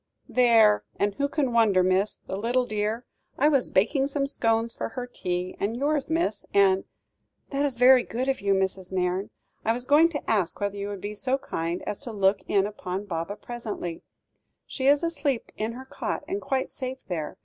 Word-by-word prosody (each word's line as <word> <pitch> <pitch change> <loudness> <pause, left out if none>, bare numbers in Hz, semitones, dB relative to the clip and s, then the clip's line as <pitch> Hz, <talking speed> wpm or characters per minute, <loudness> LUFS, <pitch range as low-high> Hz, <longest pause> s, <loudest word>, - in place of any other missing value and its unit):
"There! 225 -4 +5
and 200 0 0
who 280 +6 -1
can 280 -4 0
wonder, 210 -6 +4
miss. 185 +3 +1
The - - -4
little 240 +5 +1
dear! 215 +2 -2 0.3
I 295 +3 +4
was 275 -4 +2
baking 265 +8 +2
some 280 0 -1
scones 230 -3 +1
for - - -4
her 245 +1 -5
tea 180 -6 -3
and 220 +4 -1
yours, 290 +1 0
miss, 320 -9 0
and 195 -1 +4 0.3
" - - -48
"That 280 +1 +1
is 255 -4 -5
very 250 +1 +7
good 250 +3 -3
of 270 - 0
you, 200 -1 +2
Mrs. 190 -1 -1
Nairne. 185 +1 -1 0.3
I 225 - +2
was 245 +1 -5
going 300 +5 +6
to 295 -3 -5
ask 195 -6 +1
whether 200 -1 -1
you 200 0 -4
would 200 -2 -6
be 205 +1 -4
so 255 +5 0
kind 170 -9 -3
as 205 - -4
to 250 -4 -6
look 200 -1 +2
in 195 -1 +3
upon 200 -1 -4
Baba 170 +1 -3
presently; 210 -6 -6 0.6
she 265 -1 -2
is 285 +3 +5
asleep 290 -7 -1
in 220 +2 -2
her 260 +2 -9
cot, - - -4
and 390 +4 -2
quite 265 -1 -1
safe 260 0 -6
there. 160 -5 -4
225 Hz, 200 wpm, -26 LUFS, 195-265 Hz, 0.6 s, very